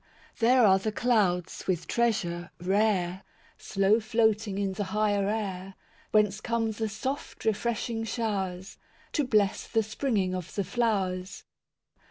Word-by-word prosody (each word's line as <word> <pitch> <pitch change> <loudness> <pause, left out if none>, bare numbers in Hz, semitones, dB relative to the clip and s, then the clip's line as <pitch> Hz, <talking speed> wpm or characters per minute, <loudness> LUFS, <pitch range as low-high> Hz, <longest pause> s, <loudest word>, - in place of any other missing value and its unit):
II - - -28
There 250 -1 +6
are 190 -1 +5
the 215 +3 -2
clouds 205 -7 0
with 180 -3 0
treasure 195 -8 0
rare, 190 -1 +1 0.4
Slow 195 +3 +2
floating 220 -2 +1
in 200 -1 -1
the 205 +1 -3
higher 205 0 +1
air, 195 -3 -3 0.3
Whence 210 -1 +2
come 230 -2 0
the 220 0 -3
soft 260 +7 -5
refreshing 225 +1 -1
showers, 195 -5 -3 0.3
To 295 - +1
bless 210 -6 +1
the 225 -1 +1
springing 215 -4 -1
of 180 -3 -5
the 200 - 0
flowers. 195 -3 -1
210 Hz, 135 wpm, -28 LUFS, 190-225 Hz, 0.4 s, There